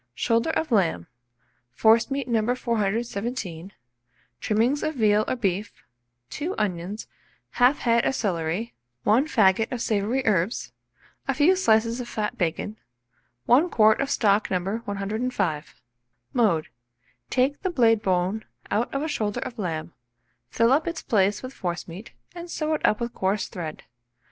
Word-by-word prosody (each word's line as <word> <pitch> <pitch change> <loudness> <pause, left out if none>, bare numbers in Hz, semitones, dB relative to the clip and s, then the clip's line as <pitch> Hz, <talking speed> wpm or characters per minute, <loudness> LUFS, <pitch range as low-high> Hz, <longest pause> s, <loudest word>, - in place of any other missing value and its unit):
Shoulder 230 - +1
of 320 -2 -1
lamb, 170 - +2 0.7
forcemeat 230 - +3
No. 235 +1 +1
417, 215 -5 -2 0.7
trimmings 230 - +1
of 310 - -2
veal 215 -3 +3
or - - 0
beef, 205 -3 -3 0.5
2 345 +6 -3
onions, 195 +1 -3 0.5
1/2 250 +3 +5
head 235 -1 +3
of - - +1
celery, 180 +2 -2 0.3
1 245 +8 +3
faggot 215 - +3
of 250 - -3
savoury 225 +4 0
herbs, 200 0 0 0.6
a 270 - 0
few 305 +7 +5
slices 230 -7 +2
of 240 - -7
fat 210 -1 -2
bacon, 180 +5 -2 0.7
1 290 +9 +4
quart 220 -3 +4
of 275 - -1
stock 210 -4 +2
No. 190 +3 -1
105. 200 -5 -2 0.5
Mode. 200 -10 +2 0.6
Take 265 +3 +1
the 375 - -1
blade 230 -9 +3
bone 190 +2 0 0.3
out 220 +4 0
of 275 - 0
a - - -1
shoulder 225 -6 -2
of 250 -3 -6
lamb, 165 -4 -3 0.6
fill 230 - +2
up 295 +4 +3
its 335 -1 -4
place 205 -1 +1
with 255 +1 -7
forcemeat, 175 +2 -5 0.2
and 345 0 -8
sew 310 -2 -1
it 305 - -2
up 210 - +3
with 235 0 -3
coarse 195 +2 -1
thread. 160 -4 -7
220 Hz, 145 wpm, -25 LUFS, 195-250 Hz, 0.7 s, 1/2